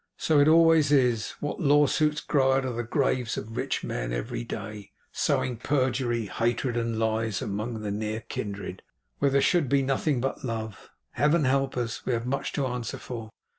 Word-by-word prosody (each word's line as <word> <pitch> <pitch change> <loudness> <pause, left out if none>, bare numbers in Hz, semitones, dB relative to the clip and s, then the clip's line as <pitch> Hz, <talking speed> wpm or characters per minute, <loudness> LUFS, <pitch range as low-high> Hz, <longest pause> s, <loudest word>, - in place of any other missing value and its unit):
So 155 -2 +3
it 145 - +5
always 165 -2 +5
is. 125 -6 +2
What 145 - -3
lawsuits 150 0 +3
grow 135 -2 +2
out 135 0 +1
of 125 -2 -3
the 120 - -2
graves 125 -1 0
of 110 +2 -6
rich - - -2
men, - - -3
every - - -3
day; 105 - -7 0.2
sowing 125 -2 0
perjury, 125 -3 0
hatred, 120 +4 -1
and 115 -1 -1
lies 110 -1 0
among 110 +3 -3
near 105 +2 -3
kindred, 100 -4 -6 0.4
where 140 - +3
there 140 0 +3
should 165 -5 +2
be 140 0 +3
nothing 135 +1 0
but 135 +2 -3
love! 110 -4 -5 0.2
Heaven 150 +2 +2
help 135 0 +1
us, 120 0 -3
we 130 - -1
have 115 0 -1
much 135 +2 -2
to 140 - 0
answer 125 -3 -3
for! 115 -3 -7
125 Hz, 175 wpm, -27 LUFS, 110-140 Hz, 0.4 s, it